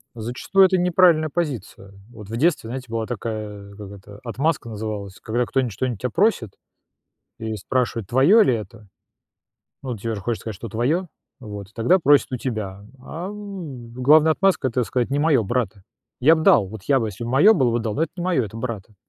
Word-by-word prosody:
Зачастую 125 Hz, -, +2 dB
это 185 Hz, 0 st, +2 dB
неправильная 175 Hz, -3 st, +4 dB
позиция. 130 Hz, -, -4 dB, 0.2 s
Вот 105 Hz, -3 st, -12 dB
в 115 Hz, -, -4 dB
детстве, 150 Hz, -3 st, +1 dB
знаете, 130 Hz, 0 st, -6 dB
была 115 Hz, -1 st, -2 dB
такая, 105 Hz, -3 st, -6 dB
как 100 Hz, -1 st, -10 dB
это, 100 Hz, +1 st, -13 dB
отмазка 135 Hz, +3 st, -1 dB
называлась, 105 Hz, -3 st, -6 dB
когда 120 Hz, +2 st, -1 dB
кто-нибудь 130 Hz, -3 st, -1 dB
что-нибудь 120 Hz, +1 st, -3 dB
тебя 125 Hz, -, -1 dB
просит 170 Hz, -, +1 dB, 0.9 s
и 110 Hz, -1 st, -4 dB
спрашивает: 115 Hz, -1 st, -2 dB
"Твоё 140 Hz, -, +5 dB
ли 125 Hz, -, +3 dB
это?" 110 Hz, -1 st, -9 dB, 1.0 s
Ну, 125 Hz, -4 st, -4 dB
тебе 115 Hz, +2 st, -4 dB
же 100 Hz, -, -6 dB
хочется 115 Hz, +1 st, -3 dB
сказать, 110 Hz, -2 st, -5 dB
что 115 Hz, -, -7 dB
твоё, 145 Hz, -, -1 dB, 0.3 s
вот, 105 Hz, -4 st, -8 dB
тогда 175 Hz, +12 st, +3 dB
просят 145 Hz, -4 st, +3 dB
у -, -, 0 dB
тебя. 105 Hz, -6 st, -4 dB, 0.2 s
Ам, 175 Hz, -, -7 dB
главная 150 Hz, +5 st, +5 dB
отмазка- 175 Hz, -7 st, +1 dB
это 125 Hz, +1 st, 0 dB
сказать: 125 Hz, +2 st, -1 dB
"Не 140 Hz, -, 0 dB
моё, 145 Hz, -7 st, +3 dB
брата". 105 Hz, -3 st, -2 dB, 0.4 s
Я 160 Hz, +6 st, +6 dB
б 160 Hz, -, -2 dB
дал, 100 Hz, -, +5 dB
вот 105 Hz, -2 st, -10 dB
я 135 Hz, -2 st, +3 dB
бы, 110 Hz, -, -1 dB
если 105 Hz, +4 st, -7 dB
моё 140 Hz, -, +5 dB
было 130 Hz, -, +2 dB
бы, 120 Hz, 0 st, 0 dB
дал, 110 Hz, -2 st, -3 dB
но 160 Hz, -, 0 dB
это 165 Hz, -, -2 dB
не 175 Hz, -, -4 dB
моё, 170 Hz, -10 st, +1 dB
это 110 Hz, +2 st, -9 dB
брата. 115 Hz, -3 st, -6 dB
120 Hz, 190 wpm, -22 LUFS, 110-155 Hz, 1.0 s, Я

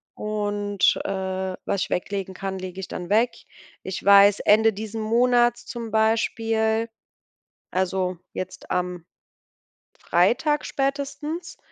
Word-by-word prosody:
Und, 205 Hz, -1 st, 0 dB
äh, 190 Hz, -1 st, -2 dB
was 200 Hz, -, -1 dB
ich -, -, -6 dB
weglegen 190 Hz, +1 st, -3 dB
kann, 190 Hz, 0 st, -4 dB
lege 185 Hz, 0 st, -7 dB
ich 190 Hz, -, -5 dB
dann 175 Hz, -1 st, -6 dB
weg. 225 Hz, +4 st, +3 dB, 0.5 s
Ich 190 Hz, 0 st, -5 dB
weiß, 200 Hz, 0 st, +7 dB
Ende 220 Hz, +1 st, +5 dB
diesen 220 Hz, +2 st, -5 dB
Monats 240 Hz, +2 st, +2 dB
zum 230 Hz, -2 st, -6 dB
Beispiel, 220 Hz, 0 st, +1 dB, 0.8 s
also, 185 Hz, 0 st, -1 dB, 0.2 s
jetzt 185 Hz, 0 st, -7 dB
am 180 Hz, -1 st, -2 dB, 1.0 s
Freitag 245 Hz, -, +2 dB
spätestens, 285 Hz, +5 st, -3 dB
205 Hz, 115 wpm, -24 LUFS, 190-230 Hz, 1.0 s, weiß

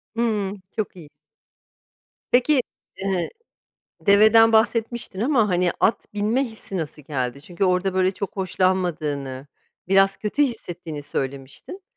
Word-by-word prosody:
Hıı, 215 Hz, -4 st, 0 dB, 0.2 s
çok 215 Hz, -3 st, -4 dB
iyi. 165 Hz, -5 st, -12 dB, 1.2 s
Peki, 255 Hz, +3 st, +4 dB, 0.4 s
ııı, 190 Hz, -3 st, 0 dB, 0.7 s
deveden 220 Hz, +2 st, +6 dB
bahsetmiştin 225 Hz, -2 st, +1 dB
ama, 235 Hz, -3 st, +3 dB
hani, 180 Hz, -1 st, +2 dB
at 220 Hz, -, +1 dB
binme 215 Hz, +6 st, +1 dB
hissi 220 Hz, -5 st, -7 dB
nasıl 155 Hz, -3 st, -5 dB
geldi? 135 Hz, -2 st, -3 dB
Çünkü 175 Hz, +4 st, -2 dB
orada, 185 Hz, +1 st, +1 dB
böyle, 185 Hz, 0 st, +3 dB
çok 200 Hz, +1 st, -6 dB
hoşlanmadığını, 155 Hz, -8 st, -1 dB, 0.4 s
biraz 195 Hz, 0 st, +4 dB
kötü 215 Hz, +9 st, 0 dB
hissettiğini 175 Hz, -, -4 dB
söylemiştin. 135 Hz, -, -5 dB
195 Hz, 115 wpm, -23 LUFS, 170-220 Hz, 1.2 s, deveden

